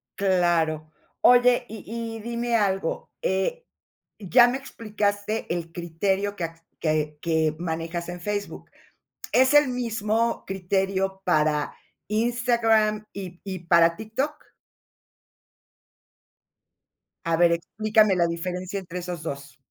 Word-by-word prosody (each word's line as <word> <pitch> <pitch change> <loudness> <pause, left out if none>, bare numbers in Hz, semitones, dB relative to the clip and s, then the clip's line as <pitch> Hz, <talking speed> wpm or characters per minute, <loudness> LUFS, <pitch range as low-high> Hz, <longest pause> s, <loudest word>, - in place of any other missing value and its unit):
Claro. 170 -5 +1 0.3
Oye, 245 0 +5
y 220 -2 -9 0.3
y - - -7
dime 235 +1 -2
algo. 195 -5 0
Eh, 190 - -1 0.5
ya 235 +5 +6
me 250 +2 -1
explicaste 215 -4 -2
el 170 -1 -4
criterio 190 +4 -1
que 180 - -5
a 165 0 -8 0.2
que 155 -1 0
que 160 -2 +1
manejas 165 0 -3
en 175 0 -7
Facebook, 205 +1 -4 0.6
¿es 260 +2 +4
el 295 -2 +6
mismo 230 -2 -1
criterio 190 0 -1
para 150 -3 +1 0.3
Instagram 225 -1 +2
y 185 -3 -8
y 190 -2 -5
para 170 -1 +5
TikTok? 225 - -2 2.9
A 165 0 +2
ver, 170 0 +5
explícame 210 +4 +2
la 170 -1 +3
diferencia 180 +3 -4
entre 180 -1 -7
esos 175 -2 -5
2. 140 -4 -6
190 Hz, 115 wpm, -25 LUFS, 170-220 Hz, 2.9 s, ya